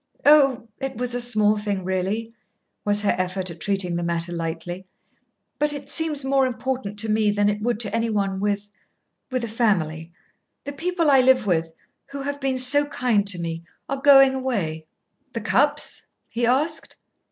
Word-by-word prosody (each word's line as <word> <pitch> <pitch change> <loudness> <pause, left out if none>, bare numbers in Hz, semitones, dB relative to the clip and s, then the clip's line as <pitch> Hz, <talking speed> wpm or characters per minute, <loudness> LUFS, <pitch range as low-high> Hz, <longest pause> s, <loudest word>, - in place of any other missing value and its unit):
"Oh, 275 -5 +5
it 270 -4 -5
was 250 0 -3
a 245 - -2
small 215 -3 +2
thing, 205 -3 -3
really," 190 +5 -2 0.5
was 205 0 +1
her 205 - +2
effort 185 0 -2
at 165 - -11
treating 190 -3 -1
the 170 - -2
matter 170 0 +1
lightly; 170 +2 -5 0.7
"but 295 0 +2
it 285 -1 -7
seems 305 -4 +1
more 270 -1 +2
important 250 -4 -4
to 220 +2 +3
me 215 -1 +2
than 205 0 +2
it 210 0 -3
would 235 -1 -1
to 210 -1 -1
any 230 0 0
one 195 -3 -1
with 205 0 -2 0.6
with 255 -2 -2
a - - -2
family. 175 -8 -1 0.5
The 285 - -6
people 335 +1 0
I 270 -1 +6
live 255 -2 +3
with 165 -4 0 0.3
who 275 0 -7
have 285 0 -4
been 265 -1 -1
so 285 +3 +4
kind 235 -8 0
to 200 -3 +2
me 165 -1 -5 0.2
are 275 -1 -4
going 270 -1 +7
away." 195 -13 -3 0.5
"The 230 - -4
Cupps?" 290 +7 +1 0.2
he 235 0 -1
asked. 305 +6 0
225 Hz, 175 wpm, -23 LUFS, 190-270 Hz, 0.7 s, going